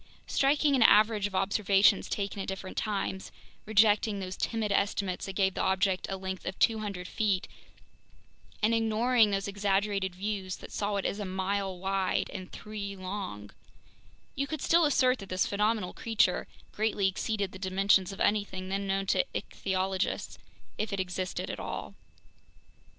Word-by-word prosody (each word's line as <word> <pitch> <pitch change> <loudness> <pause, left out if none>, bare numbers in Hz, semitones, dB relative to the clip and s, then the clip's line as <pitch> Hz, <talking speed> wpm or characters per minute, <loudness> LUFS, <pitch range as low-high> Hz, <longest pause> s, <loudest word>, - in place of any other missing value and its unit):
Striking 285 +1 +3
an 255 - +2
average 215 -1 +5
of 195 - -8
observations 200 0 +3
taken 200 -1 -3
at - - -5
different 190 0 -5
times—rejecting 210 +1 0
those 185 -1 -5
timid 220 -1 -1
estimates 200 -2 0
that 195 - -5
gave 190 -1 +2
the - - -2
object 190 0 +1
a 195 - -2
length 190 0 -5
of 185 - -4
200 215 -5 0
feet, 200 -4 0 1.2
and 220 +2 +4
ignoring 225 +1 +3
those 195 0 -1
exaggerated 200 -1 0
views 195 -1 -3
that - - -11
saw 205 0 -1
it 200 - -1
as 200 - -1
a - - -2
mile 190 0 -2
wide 190 0 -1
and 185 -1 -7
three 205 -2 -6
long—you 185 - -8
could 310 -2 -4
still 335 0 +4
assert 260 -3 +3
that 195 - -9
this 185 0 +1
phenomenal 210 -2 0
creature 210 -5 +1 0.2
greatly 210 -2 +1
exceeded 200 0 -2
the 190 - -10
dimensions 190 0 +2
of 195 - -9
anything 200 -3 0
then 195 +1 -2
known 195 0 0
to 195 - +2
ichthyologists, 190 0 -2 0.4
if 215 +1 -1
it 200 - -2
existed 185 0 -3
at - - -5
all. - - -5
200 Hz, 150 wpm, -29 LUFS, 190-215 Hz, 1.2 s, average